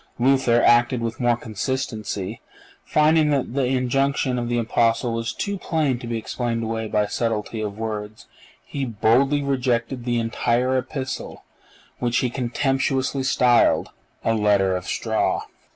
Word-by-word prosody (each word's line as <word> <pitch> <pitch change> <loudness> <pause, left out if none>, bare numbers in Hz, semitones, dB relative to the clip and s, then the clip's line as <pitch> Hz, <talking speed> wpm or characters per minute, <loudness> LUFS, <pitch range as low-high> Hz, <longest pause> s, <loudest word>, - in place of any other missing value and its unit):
Luther 125 -2 +3
acted 120 +1 +4
with 115 0 -4
more 120 -2 +2
consistency. 110 -3 -4 0.4
Finding 155 0 +3
that 140 -4 0
the 135 -1 +1
injunction 130 0 +1
of 120 0 -3
the 120 - 0
Apostle 115 +1 +1
was 115 0 -2
too 200 - -3
plain 150 -9 0
to 120 - -8
be 115 -1 -2
explained 115 +1 -3
away 110 0 -3
by 105 0 +1
subtlety 110 0 -2
of 105 -1 -4
words, 110 -1 -5 0.4
he 140 - -4
boldly 130 +5 +2
rejected 125 -2 -1
the 120 -1 0
entire 120 +2 0
Epistle, 130 0 -4 0.6
which 120 -1 0
he 125 - 0
contemptuously 135 +2 0
styled 125 -2 +3 0.4
"a 115 - +3
letter 100 -3 +2
of 90 0 -5
straw." - - 0
120 Hz, 140 wpm, -23 LUFS, 115-130 Hz, 0.6 s, acted